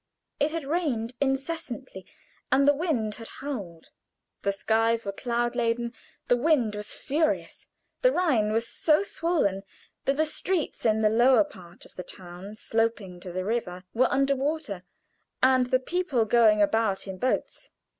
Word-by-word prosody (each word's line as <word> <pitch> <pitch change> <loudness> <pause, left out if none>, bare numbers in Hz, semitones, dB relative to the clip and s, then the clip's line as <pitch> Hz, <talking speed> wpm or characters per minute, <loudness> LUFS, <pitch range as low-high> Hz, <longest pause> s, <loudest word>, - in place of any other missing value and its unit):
It 290 - +2
had 325 0 -3
rained 270 -7 -1
incessantly, 270 - -3 0.4
and 275 +1 +4
the 290 - +7
wind 275 -9 -1
had 225 - -8
howled. 200 - -6 0.5
The 200 - +1
skies 225 +3 +1
were 200 - -1
cloud 240 +3 -1
laden, 235 0 0 0.3
the 245 - +4
wind 250 -5 +2
was 210 0 -5
furious. 310 +3 -1 0.3
The - - +5
Rhine 265 - +2
was 230 +1 0
so 310 +3 +2
swollen 330 - 0 0.4
that 275 +1 +1
the 315 - +3
streets 320 -4 -2
in 220 0 +2
the 215 - +5
lower 250 +5 +5
part 180 - -14
of - - -19
the 180 - -4
town 180 +3 -10
sloping 220 -5 -1
to 180 0 -8
the 185 +1 -3
river 190 -5 -2
were 250 +3 +3
under 275 0 +2
water, 275 - -2 0.6
and 260 -1 +5
the 255 - +3
people 280 -5 0
going 215 -2 +5
about 210 -2 +1
in 190 -1 -6
boats. 260 - -2
235 Hz, 155 wpm, -27 LUFS, 210-280 Hz, 0.6 s, the